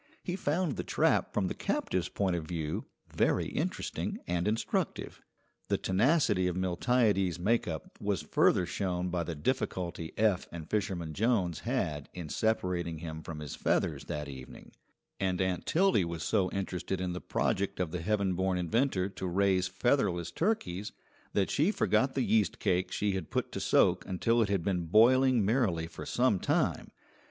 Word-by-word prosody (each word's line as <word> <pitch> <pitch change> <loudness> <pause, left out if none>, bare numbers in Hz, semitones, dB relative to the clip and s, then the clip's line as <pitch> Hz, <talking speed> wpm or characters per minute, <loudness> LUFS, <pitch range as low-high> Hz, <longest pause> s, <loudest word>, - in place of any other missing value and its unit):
He 180 - -2
found 170 -3 -1
the - - -2
trap - - +2
from 105 - 0
the - - -2
captive's 90 -2 -1
point 95 -3 0
of 80 -2 -4
view 80 -3 -3 0.3
very - - +2
interesting - - -3
and 90 +1 -1
instructive. 110 +2 -2 0.5
The - - +1
tenacity 105 - +2
of 90 - -1
Miltiades's 95 0 +1
make 110 +7 +1
up 80 -3 -6
was - - -1
further 90 - +3
shown 90 -1 -2
by 90 -1 -1
the 85 -1 -4
difficulty 85 - -2
Eph 105 -4 +2
and 80 -2 -7
Fisherman 90 -6 -2
Jones 95 -5 +1
had 75 -2 -2
in 85 -4 -6
separating 90 -6 0
him 80 0 -6
from 80 -1 -7
his 75 - -6
feathers - - 0
that 75 -1 -4
evening; 65 -2 -10 0.5
and 95 -2 0
Aunt 95 -1 -1
Tildy 180 - +3
was 85 -1 -4
so 95 -4 +1
interested 95 -1 -3
in 90 -1 -2
the 90 - -5
project 100 +1 -1
of 90 -4 -1
the 90 - -3
heaven 100 0 +1
born 95 +1 0
inventor 95 +2 +1
to 95 -1 -5
raise 95 0 +2
featherless 95 - 0
turkeys 105 - -1 0.4
that 100 -2 +1
she 155 +7 +3
forgot 130 -10 +1
the 135 - +1
yeast 110 -4 +2
cake 95 -2 0
she 105 0 0
had 95 -1 -4
put - - -2
to - - -4
soak - - +3
until 115 +5 +2
it 105 - +1
had 100 -4 0
been 90 -3 0
boiling 120 +4 +5
merrily 100 -8 +1
for 80 - -9
some 120 -6 +2
time. - - 0
95 Hz, 170 wpm, -31 LUFS, 85-110 Hz, 0.5 s, boiling